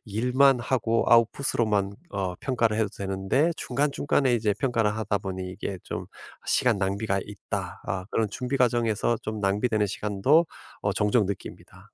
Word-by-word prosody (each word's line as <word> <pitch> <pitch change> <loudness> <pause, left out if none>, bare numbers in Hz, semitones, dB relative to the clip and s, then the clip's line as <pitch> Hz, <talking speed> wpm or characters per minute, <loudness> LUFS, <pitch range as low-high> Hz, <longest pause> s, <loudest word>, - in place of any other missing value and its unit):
일만 125 +5 +3
하고 115 -2 +1
아웃풋 120 +5 +3
으로만 105 -4 +1 0.2
어 95 -2 -2
평가를 115 -5 +1
해도 110 - +1
되는데 95 - 0
중간중간에 140 -1 +1
이제 105 -3 +1
평가를 115 -5 +1
하다 105 -2 -1
보니 95 -1 -5
'이게 95 0 -5
좀 - - -5 0.4
시간 125 -4 +3
낭비가 100 +1 0
있다.' 105 -1 -6
아 95 -1 -2
그런 110 -2 +1
준비 125 +5 -2
과정에서 120 -2 +1
좀 110 -1 -4
낭비되는 105 +2 +1
시간도 105 - +2 0.3
어 - - 0
종종 105 0 +2
느낍니다. 100 0 -8
110 Hz, 335 characters per minute, -26 LUFS, 100-125 Hz, 0.4 s, 일만